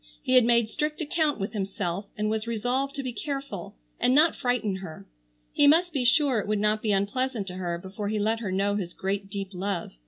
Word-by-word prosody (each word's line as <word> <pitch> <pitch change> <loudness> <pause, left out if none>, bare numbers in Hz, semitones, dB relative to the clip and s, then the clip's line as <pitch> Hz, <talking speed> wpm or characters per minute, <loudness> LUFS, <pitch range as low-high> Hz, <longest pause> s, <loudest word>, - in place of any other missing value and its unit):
He 255 - 0
had 250 -2 +7
made 235 -1 +4
strict 300 +6 -2
account 310 -3 0
with 200 +3 -3
himself 195 -2 -3
and 210 0 0
was 220 +1 -1
resolved 250 +5 -1
to 275 - -3
be 255 -2 -3
careful 275 - -5 0.2
and 255 - +3
not 315 +3 +5
frighten 245 -7 0
her. 160 - -9 0.5
He 290 - +5
must 335 +3 +4
be 265 -4 0
sure 265 -1 +4
it 205 - -4
would 215 0 +1
not 210 +1 +1
be 215 - 0
unpleasant 210 +3 0
to - - -7
her 175 -2 -2
before 195 +3 -5
he 215 - -1
let 220 +2 +1
her 210 -5 -3
know 200 +2 +1
his 180 -3 -5
great 195 +1 -2
deep 195 -1 -4
love. 185 -1 -3
215 Hz, 220 wpm, -27 LUFS, 195-260 Hz, 0.5 s, had